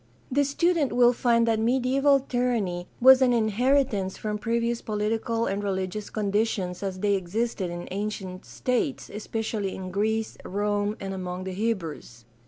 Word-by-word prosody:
The 285 +2 +3
student 310 0 +1
will 245 0 +5
find 235 -1 +2
that 225 -1 +2
mediaeval 265 +4 +3
tyranny 235 -9 -1
was 265 +1 +8
an 250 -2 +4
inheritance 230 -2 +1
from 210 -1 -3
previous 235 +1 0
political 225 +2 -1
and 200 +1 -2
religious 190 +1 -3
conditions 205 -3 -1
as 190 -2 -4
they 205 -1 +2
existed 195 +1 -1
in 175 0 -6
ancient 195 -2 -4
states, 250 +2 -2
especially 215 -1 -3
in 185 -1 -6
Greece, 220 +3 -1
Rome, 205 +1 -1
and 195 0 -4
among 180 -1 -4
the 190 0 -5
Hebrews. 170 - -3
215 Hz, 145 wpm, -26 LUFS, 195-240 Hz, -, was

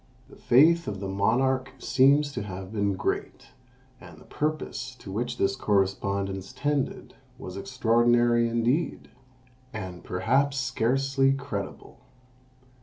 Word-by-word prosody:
The - - -13
faith 165 +7 +4
of 100 -2 -4
the 100 - -4
monarch 130 +7 +1
seems 140 +3 +3
to - - -4
have 95 0 -7
been 100 -2 0
great, - - -3 0.5
and - - -13
the - - -16
purpose 150 -4 -3
to 105 -6 -10
which 120 +4 -3
this 100 0 +1
correspondence 95 -1 -1
tended 145 -2 -2 0.2
was 90 - -8
extraordinary 120 +1 +2
indeed, 120 +7 -1 0.6
and 95 -5 -7
perhaps 135 +10 +1
scarcely 135 +2 +1
credible. 135 -8 -6
120 Hz, 115 wpm, -26 LUFS, 100-135 Hz, 0.6 s, faith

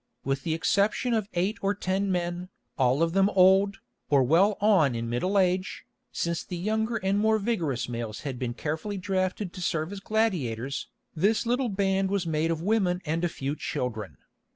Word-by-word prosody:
With 135 0 -1
the 160 +3 -1
exception 205 +8 +1
of 215 -3 0
eight 190 +5 0
or 200 +1 +1
ten 195 0 -1
men, 175 0 -2 0.3
all 130 +2 +2
of 165 0 0
them 195 +1 +4
old, 195 +1 +4 0.3
or 140 -2 +4
well 180 +10 +3
on 190 - +4
in 115 0 -3
middle 185 +12 0
age, 185 0 0 0.3
since 170 -1 -2
the 180 - -6
younger 220 +5 -1
and 195 -1 0
more 220 +1 +3
vigorous 175 - -1
males 115 -3 -5
had 135 -4 -5
been 120 -2 -3
carefully 160 +9 -3
drafted 185 0 -2
to 185 - -8
serve 165 0 -1
as 200 - -6
gladiators, 145 - -1 0.3
this 205 +8 +1
little 245 +1 +1
band 195 -1 +1
was 195 -3 0
made 160 0 0
of 165 -1 -2
women 190 -3 +1
and 165 +2 -1
a 175 - +2
few 140 -1 -3
children. 110 - -4
180 Hz, 180 wpm, -27 LUFS, 150-200 Hz, 0.3 s, them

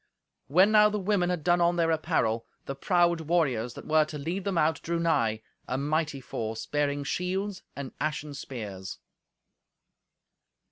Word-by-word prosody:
When 185 +9 +5
now 210 -1 +7
the 210 - -2
women 195 -2 +1
had 175 -4 -2
done 175 +2 +3
on 170 0 +3
their 165 -1 +2
apparel, 115 -9 0 0.2
the 135 - -3
proud 170 +3 +2
warriors 135 -8 0
that - - -9
were 155 0 +4
to 150 0 -7
lead 170 +7 -3
them 195 -3 -1
out 155 -1 +2
drew 170 0 -2
nigh, 115 -10 +1 0.2
a 130 - -1
mighty 150 +1 -1
force, 110 -2 -4
bearing 145 -1 0
shields 190 +6 -2
and 140 -2 -6
ashen 150 -1 -2
spears. 105 -9 -7
155 Hz, 155 wpm, -28 LUFS, 135-175 Hz, 0.2 s, now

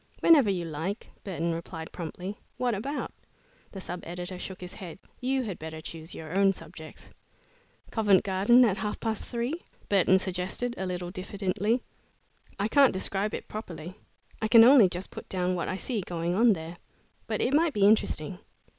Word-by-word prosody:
"Whenever 290 -10 +6
you 180 -3 -1
like," 165 +7 -4
Burton 170 -3 -2
replied 165 -1 -6
promptly. 180 +5 -6 0.2
"What 245 -1 +1
about?" 270 +9 -3 0.6
The 195 - -7
sub 180 -1 -5
editor 180 +2 -6
shook 190 0 -6
his 180 0 -7
head. 175 -4 -8 0.2
"You 260 +1 0
had 200 -7 -5
better 160 0 -7
choose 160 +1 -8
your 160 +2 -7
own 195 0 +4
subjects." 160 -3 -11 0.8
"Covent 205 -5 +4
Garden 205 +6 +5
at 200 -4 +1
half 210 -1 -3
past 220 -2 -3
three?" 245 +8 -3 0.3
Burton 190 -1 +5
suggested, 190 +6 -2
a 190 - -3
little 180 -1 -4
diffidently. 200 +4 -1 0.8
"I 200 - +1
can't 275 +3 +5
describe 195 +2 -1
it - - -7
properly. 175 -5 -7 0.5
I 220 - +1
can 225 0 +9
only 240 -5 +8
just 180 +2 -4
put - - -9
down 180 -1 0
what 175 - -2
I - - -2
see 220 +2 -2
going 170 -1 -2
on 225 +3 +5
there, 165 -1 -7 0.5
but 215 -2 -1
it 255 - +1
might 315 +1 +3
be 205 -3 +3
interesting." 185 -5 +2
190 Hz, 175 wpm, -28 LUFS, 175-225 Hz, 0.8 s, can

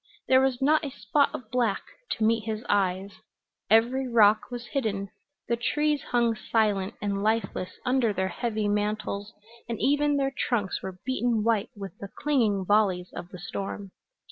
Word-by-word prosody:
There 260 0 +6
was 265 -1 +1
not 305 +3 +4
a 290 - -2
spot 255 +5 +1
of 225 -3 -8
black 235 -5 +1 0.3
to 220 - -3
meet 225 0 +2
his 220 +1 -4
eyes; 195 0 +1 0.6
every 240 +5 +3
rock 215 -3 +4
was 240 -1 -6
hidden; 200 -8 -1 0.4
the 235 - +2
trees 295 +5 0
hung 235 -2 +2
silent 210 -4 0
and 200 -1 -1
lifeless 215 -4 -1
under 250 -3 +2
their 190 -1 -1
heavy 220 +1 -2
mantles 210 0 -1 0.4
and 230 - -3
even 290 +1 +2
their 270 -1 0
trunks 210 -7 -1
were 190 -1 -6
beaten 245 -4 +1
white 225 -1 +1
with 195 -4 -8
the 200 - -7
clinging 225 -10 +1
volleys 190 -3 +2
of 175 - -7
the 180 - -9
storm. 195 +1 -5
220 Hz, 165 wpm, -27 LUFS, 200-250 Hz, 0.6 s, There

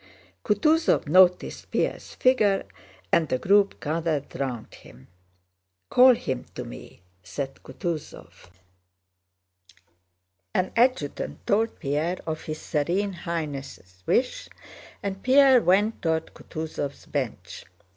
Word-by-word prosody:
Kutúzov 305 +10 +2
noticed 180 +3 +3
Pierre's - - -2
figure 215 -7 +3 0.5
and 160 -3 +3
the 130 - +1
group 200 +7 +3
gathered 155 -2 -2
round 125 -5 -4
him. 65 +2 -16 0.8
"Call 255 0 +7
him 130 - -4
to - - -4
me," 85 - -11 0.2
said 135 +10 -6
Kutúzov. 150 - -7 2.1
An 185 - +1
adjutant 235 - 0
told 220 +3 +1
Pierre 155 +4 -1
of 160 -1 -3
his 155 0 -5
Serene 175 +7 -1
Highness' 145 - -6
wish, 265 - 0 0.5
and 195 -1 -4
Pierre 265 -1 +6
went 205 +4 +2
toward 160 -1 -1
Kutúzov's 155 -3 -6
bench. 135 -6 -5
170 Hz, 105 wpm, -25 LUFS, 145-205 Hz, 2.1 s, Call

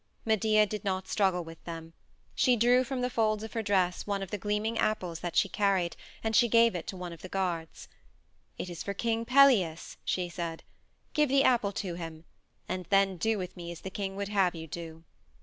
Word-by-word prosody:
Medea 215 -1 +4
did 210 -1 -5
not 190 -2 -2
struggle 190 -4 +1
with 165 0 -12
them. 165 -1 -7 0.4
She 250 -2 +4
drew 245 +2 +4
from 260 0 -3
the 250 - 0
folds 215 -2 +1
of 220 - -7
her 225 - -1
dress 190 -4 +1
one 200 -1 -1
of 190 - -8
the 210 - -1
gleaming 210 +3 -1
apples 180 -6 -1
that 175 -2 -5
she - - +4
carried 195 -4 +1 0.3
and 220 0 0
she 240 - +6
gave 230 +1 +5
it 175 - -5
to 190 - -5
one 180 -1 -6
of 165 - -12
the 185 - -8
guards. 175 -4 -3 0.7
"It - - -4
is 175 -2 -6
for 200 - -4
King 230 +1 -1
Pelias," 245 -12 +4
she 180 -1 -1
said. 170 -2 -5 0.5
"Give 300 -2 +3
the 275 +1 +4
apple 235 -7 +3
to 190 -3 -3
him 165 -1 -7 0.4
and 185 0 -3
then 195 -2 +3
do 220 +6 +1
with 180 -2 -5
me 170 -1 -7
as 170 - -9
the 190 - -6
king 195 -1 -4
would 200 0 -3
have 195 -4 +2
you 160 0 -6
do." 165 0 -8
195 Hz, 215 wpm, -30 LUFS, 175-220 Hz, 0.7 s, she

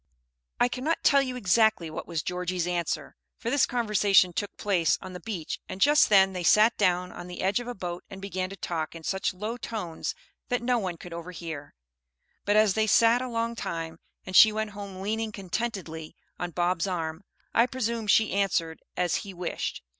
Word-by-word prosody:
I 245 - +5
cannot 265 +6 -2
tell 280 -1 +6
you 255 -2 -3
exactly 220 -5 +2
what - - -6
was 165 -3 -2
Georgie's 180 -1 -2
answer, 175 -1 -2 0.2
for 235 - -3
this 285 -2 +3
conversation 205 -6 +3
took 205 +3 -4
place 180 -6 +2
on 185 - -9
the 180 - -7
beach, 175 -4 -5
and 185 - -6
just 295 +6 +5
then 195 -2 +5
they 180 - -3
sat 215 +6 +5
down 180 -2 +1
on 175 - -9
the 180 0 -6
edge 195 +4 +2
of 245 - -7
a 245 - -4
boat 175 -2 -5
and 195 - -9
began 185 -1 -3
to 195 - -8
talk 165 -4 -4
in 165 - -9
such 190 +4 -1
low 215 +6 -5
tones 210 -9 -4 0.3
that 245 -2 0
no 245 0 +2
one 185 -5 -3
could 175 +1 -10
overhear; 165 -4 -7 0.7
but 205 - +2
as 215 -2 +5
they 220 +1 +1
sat 230 +3 +5
a 255 - -3
long 230 0 -1
time 165 -6 -5 0.3
and 185 - -5
she 220 - +9
went 215 0 -2
home 200 -2 -8
leaning 220 +2 -2
contentedly 190 -5 -4 0.2
on 175 - -2
Bob's 175 +1 0
arm, 165 -1 -3 0.3
I 235 +2 +4
presume 235 -3 -2
she 220 +2 +4
answered 180 -5 0 0.2
as 175 -2 +1
he 195 -3 -7
wished. 175 0 -4
195 Hz, 195 wpm, -27 LUFS, 175-225 Hz, 0.7 s, she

